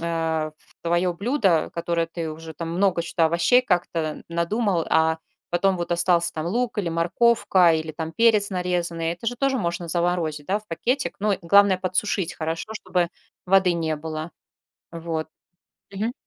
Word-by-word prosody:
э, 165 -2 -1
в - - -27
твое 175 +1 +1
блюдо, 200 - +1
которое 170 0 -1
ты 165 -1 -5
уже 160 0 -9
там 165 +1 -5
много 185 -1 +2
чё-то 165 -1 +1
овощей 170 +10 +4
как-то 170 -7 -1
надумал, 170 +1 0
а 160 0 +3 0.3
потом 185 +2 +2
вот 175 0 -2
остался 170 0 +2
там 155 +1 -4
лук, 235 +4 -1
или 180 - 0
морковка, 175 +1 +3
или 155 0 -3
там 160 +1 -5
перец 220 -2 +4
нарезанный- 175 -3 -1
это 175 +7 -9
же 245 +1 -1
тоже 270 0 +1
можно 170 -3 -3
заморозить, 170 -3 -1
да, 200 +2 +1
в 215 - -20
пакетик? 250 +11 -1
Ну 210 0 +2
и 195 - -1
главное- 200 +2 +5
подсушить 185 -1 -1
хорошо, 165 +7 -4
чтобы 180 -4 -1 0.4
воды 190 -1 +4
не 160 -2 -1
было. 155 +1 -5 0.6
Вот. 165 -1 -4 0.6
Мгм. 215 +4 -2
170 Hz, 160 wpm, -24 LUFS, 165-195 Hz, 0.6 s, главное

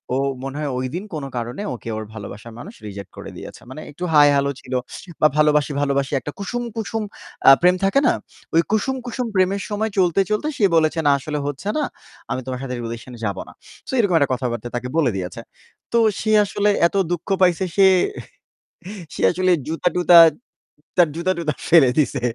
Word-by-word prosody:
ও - - +1 0.3
মনে 135 +1 -5
হয় 145 -3 -2
ঐদিন 130 +10 -3
কোন 150 -3 -4
কারণে 120 - -4
ওকে 115 - -9
ওর 110 - -4
ভালোবাসার 110 +2 -9
মানুষ - - -9
রিজেক্ট 100 -1 -9
করে - - -8
দিয়েছে। - - -10
মানে 155 - -8
একটু 175 +5 -9
হায় 145 -1 +7
হ্যালো 140 0 +1
ছিল 130 - -8 0.5
বা 155 - +7
ভালোবাসি, 150 -1 +3
ভালোবাসি 140 -1 0
একটা 140 +4 -6
কুসুম, 240 +5 -3
কুসুম 225 0 -3 0.5
আ - - +11
প্রেম 180 +1 +5
থাকে 195 +8 +3
না। - - +4 0.4
ওই 165 - +6
কুসুম, 265 +5 +1
কুসুম 245 0 -3
প্রেমের 190 +2 +2
সময় 215 +1 -2
চলতে, 180 0 +3
চলতে 210 +8 0
সে 205 - +3
বলেছে 160 +1 +2
না - - +6
আসলে 150 +2 -4
হচ্ছে 145 +8 -4
না, 300 - +1 0.5
আমি 130 - -2
তোমার 125 -1 -4
সাথে 125 -1 -4
রিলেশন 115 +2 -7
যাবো 100 -3 -3
না। - - -14 0.4
সো - - -5
এরকম 195 -6 +2
একটা 140 -2 +2
কথাবার্তা 120 -2 -3
তাকে 125 +1 -5
বলে 145 -7 +3
দিয়েছে। 90 +3 -5 0.5
তো - - +4 0.2
সে 215 - 0
আসলে 205 +1 0 0.2
এত 200 - -12 0.2
দুঃখ 175 +2 -3
পাইছে 180 +1 +3
সে, 195 -1 +7 1.3
সে - - -5
আসলে 185 +1 +1 0.2
জুতা-টুতা, 175 +2 +3 0.8
তার 175 -2 +5
জুতা-টুতা 170 -4 -1
ফেলে 150 -7 +6
দিছে। 140 -4 +1
155 Hz, 185 wpm, -21 LUFS, 130-185 Hz, 1.3 s, আ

